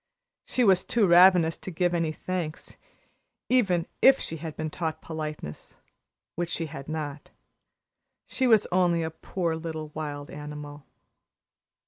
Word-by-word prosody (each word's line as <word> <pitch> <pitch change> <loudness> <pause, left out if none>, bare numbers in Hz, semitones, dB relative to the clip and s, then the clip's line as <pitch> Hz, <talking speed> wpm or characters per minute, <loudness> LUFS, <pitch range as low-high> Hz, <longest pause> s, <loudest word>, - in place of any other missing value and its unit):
She 250 - +1
was 190 -4 +5
too 230 -3 +2
ravenous 175 -2 +6
to - - -7
give 175 0 0
any 165 -2 0
thanks, 170 -1 -5 0.7
even 195 -10 +3 0.2
if 270 0 +7
she 165 - -5
had 155 -1 -7
been 155 -1 -3
taught 160 -2 -3
politeness 155 - -7 0.6
which 175 0 -2
she 165 - -2
had 145 -2 -8
not. 150 -2 -5 1.0
She 260 - 0
was 220 -4 +5
only 175 -2 +2
a 160 - -3
poor 170 +1 -3
little 160 -1 -5
wild 145 -2 -6
animal. 150 -1 -8
165 Hz, 135 wpm, -27 LUFS, 155-180 Hz, 1.0 s, if